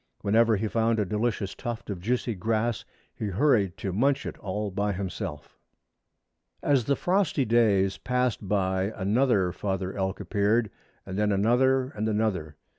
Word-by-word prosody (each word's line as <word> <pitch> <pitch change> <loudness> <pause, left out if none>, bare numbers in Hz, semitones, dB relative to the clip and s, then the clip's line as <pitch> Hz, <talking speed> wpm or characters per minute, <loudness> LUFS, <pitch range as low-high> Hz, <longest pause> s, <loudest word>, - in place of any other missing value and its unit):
Whenever 110 +2 +3
he 110 +3 -1
found 115 +1 +1
a 105 - +1
delicious 105 0 -1
tuft 120 -1 -6
of 95 - -5
juicy 120 +3 -1
grass 110 +2 -1 0.3
he 110 - -4
hurried 100 -3 +2
to 95 - -4
munch 135 +7 +1
it - - -5
all 105 +1 -3
by 100 +2 -1
himself. 90 -5 -6 1.0
As 135 -5 +2
the 140 - +2
frosty 180 -7 +1
days 100 -5 +3
passed 125 -5 -1
by 95 0 0
another 100 -2 +2
father 95 0 -3
elk 95 0 -2
appeared, 105 +3 +1 0.3
and 95 +1 -4
then 105 0 +2
another 125 +6 +3
and 110 -4 -3
another. 100 -8 -1
105 Hz, 150 wpm, -27 LUFS, 95-120 Hz, 1.0 s, Whenever